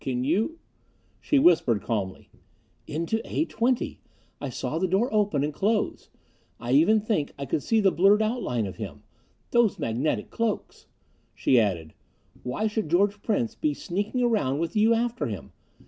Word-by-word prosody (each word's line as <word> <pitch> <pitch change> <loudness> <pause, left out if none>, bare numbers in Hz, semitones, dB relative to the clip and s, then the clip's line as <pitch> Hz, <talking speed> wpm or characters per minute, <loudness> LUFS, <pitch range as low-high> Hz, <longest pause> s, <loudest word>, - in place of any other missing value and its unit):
Can 125 -1 -2
you 210 - 0 0.3
" - - -39
She 295 - +2
whispered 155 - +4
calmly, 100 -5 -3 0.6
"Into 170 +9 -2
A 315 - -1
20. 245 -2 -1 0.4
I 140 - -3
saw 130 +5 -3
the 185 - +1
door 200 +7 +1
open 205 -10 +2
and 150 +1 -2
close 210 +6 -1 0.5
I 120 - -4
even 165 +11 +5
think 205 -9 -1
I 140 - -4
could 140 - -1
see 225 +8 +2
the 195 -3 +4
blurred 200 +5 +4
outline 215 - -1
of 95 -3 -7
him. 100 -10 -7 0.5
Those 235 -4 +3
magnetic 115 0 -1
cloaks!" 230 -2 -3 0.5
She 125 - +3
added, 85 -8 -1 0.5
"Why 125 +13 -2
should 215 -5 -1
George 200 +4 +2
Prince 225 +1 0
be 300 +4 -1
sneaking 205 +7 -2
around 205 - +1
with 165 +3 -3
you 220 +2 +4
after 240 +1 -1
him? - - -6
190 Hz, 165 wpm, -26 LUFS, 130-220 Hz, 0.6 s, even